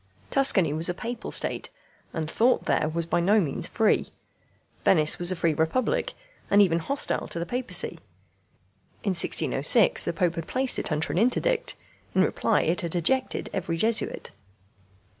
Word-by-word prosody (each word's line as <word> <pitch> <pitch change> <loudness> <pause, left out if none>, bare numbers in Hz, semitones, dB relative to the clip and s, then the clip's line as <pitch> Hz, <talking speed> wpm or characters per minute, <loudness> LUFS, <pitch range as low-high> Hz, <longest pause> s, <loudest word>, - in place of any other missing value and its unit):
Tuscany 195 - +3
was 160 +3 -2
a 175 - -2
Papal 235 +4 -6
State, - - +1 0.4
and 160 -1 -4
thought 235 +10 +1
there 155 - 0
was 165 +1 -3
by 170 - -1
no 200 +5 +3
means 155 -8 -2
free. 220 -2 0 0.7
Venice 155 -4 +4
was 175 +1 +3
a - - -1
free 165 -2 0
republic, 255 - -1 0.4
and 200 - +2
was 205 - +7
even 165 -2 -1
hostile 280 - 0
to - - -6
the 170 - -3
Papacy. 250 +5 +1 1.0
In 205 - -1
1606 180 - +2
the - - -2
Pope 170 0 -1
had 165 - -5
placed 260 0 +1
it - - -5
under 155 0 -1
an 175 - 0
interdict. - - 0 0.4
In - - +4
reply - - 0
it 175 +5 -1
had 170 -1 -4
ejected 260 +10 -1
every 165 -3 -3
Jesuit. 220 +5 0
180 Hz, 165 wpm, -25 LUFS, 165-235 Hz, 1.0 s, was